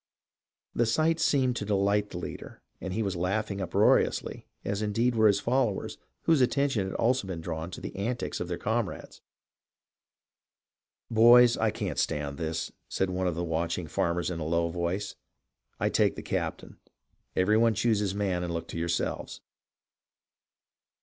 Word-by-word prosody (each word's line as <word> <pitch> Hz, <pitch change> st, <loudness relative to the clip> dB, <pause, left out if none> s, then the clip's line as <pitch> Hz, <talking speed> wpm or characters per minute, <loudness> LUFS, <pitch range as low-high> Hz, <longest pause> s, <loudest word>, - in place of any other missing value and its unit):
The 120 Hz, -, +1 dB
sight 160 Hz, +7 st, +2 dB
seemed 130 Hz, -5 st, +2 dB
to -, -, -3 dB
delight 100 Hz, 0 st, +1 dB
the -, -, -7 dB
leader, 90 Hz, -, -8 dB, 0.2 s
and 95 Hz, -, -4 dB
he 110 Hz, +4 st, -1 dB
was 100 Hz, -2 st, -2 dB
laughing 100 Hz, +3 st, -1 dB
uproariously, 90 Hz, -3 st, +1 dB, 0.2 s
as 100 Hz, +1 st, -2 dB
indeed 115 Hz, +4 st, +1 dB
were 110 Hz, -1 st, +4 dB
his 100 Hz, -1 st, +3 dB
followers, 120 Hz, -1 st, -1 dB, 0.2 s
whose 160 Hz, -4 st, +4 dB
attention 130 Hz, -5 st, +1 dB
had 95 Hz, -, -6 dB
also 120 Hz, -3 st, +1 dB
been 90 Hz, -3 st, -4 dB
drawn 80 Hz, 0 st, -4 dB
to -, -, -8 dB
the -, -, -7 dB
antics 115 Hz, +5 st, -3 dB
of 90 Hz, -, -3 dB
their 85 Hz, -1 st, -3 dB
comrades. 110 Hz, -3 st, -3 dB, 0.9 s
" -, -, -35 dB
Boys, 120 Hz, +2 st, +7 dB
I 110 Hz, -, +1 dB
can't -, -, -3 dB
stand 70 Hz, -1 st, -2 dB
this," 80 Hz, -1 st, -3 dB, 0.2 s
said 95 Hz, -1 st, -1 dB
one 90 Hz, 0 st, -1 dB
of 85 Hz, -, -1 dB
the 85 Hz, -, -2 dB
watching 85 Hz, +1 st, -2 dB
farmers 85 Hz, +3 st, -1 dB
in 85 Hz, -, -4 dB
a -, -, -3 dB
low 85 Hz, +2 st, 0 dB
voice. 90 Hz, +4 st, -3 dB, 0.3 s
" -, -, -48 dB
I -, -, +1 dB
take -, -, +2 dB
the -, -, -7 dB
captain. -, -, -4 dB, 0.6 s
Every 105 Hz, +4 st, +3 dB
one 115 Hz, -1 st, +3 dB
choose 110 Hz, 0 st, +2 dB
his 100 Hz, -2 st, -1 dB
man 95 Hz, -3 st, 0 dB
and 85 Hz, -, -3 dB
look 85 Hz, 0 st, -4 dB
to 85 Hz, -, -5 dB
yourselves." 85 Hz, 0 st, -2 dB
100 Hz, 170 wpm, -28 LUFS, 85-115 Hz, 0.9 s, Boys